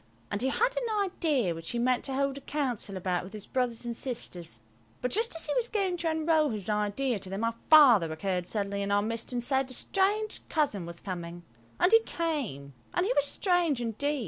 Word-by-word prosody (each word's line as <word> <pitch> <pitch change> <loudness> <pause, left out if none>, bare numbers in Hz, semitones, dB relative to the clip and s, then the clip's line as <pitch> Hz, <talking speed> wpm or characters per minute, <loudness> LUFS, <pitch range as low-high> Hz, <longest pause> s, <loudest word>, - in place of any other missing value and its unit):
And 205 - -1
he 260 - +2
had 480 - +1
an 455 -4 0
idea 295 - 0
which 165 0 -7
he 240 - -1
meant 245 +1 +2
to 265 - -2
hold 275 0 0
a 280 - -7
council 250 -9 -2
about 180 -1 -1
with 190 +3 -10
his 210 -2 -7
brothers 245 -2 -1
and 235 -1 -3
sisters; 180 - -4 0.4
but 250 - -2
just 450 -2 +1
as 325 - -4
he 295 - -1
was 485 -1 0
going 390 -4 0
to 335 -1 0
unroll 315 -1 +2
his 210 -3 -3
idea 210 +3 0
to 190 -1 -6
them 195 +3 -3
our 230 0 +1 0.2
Father 245 - +7
occurred 180 +2 -2
suddenly 200 -1 -2
in 200 0 -2
our 205 0 +3
midst 230 +2 -3
and 245 -1 -2
said 265 +1 0
a 255 - -8
strange 415 - 0
cousin 240 - 0
was 170 0 -9
coming, 175 -2 -6 0.4
and 360 - +4
he 455 - +9
came, 280 - -3 0.2
and 355 - +2
he 475 - +1
was 285 - +3
strange 345 - +1
indeed! 275 +6 -1
250 Hz, 220 wpm, -29 LUFS, 200-315 Hz, 0.4 s, he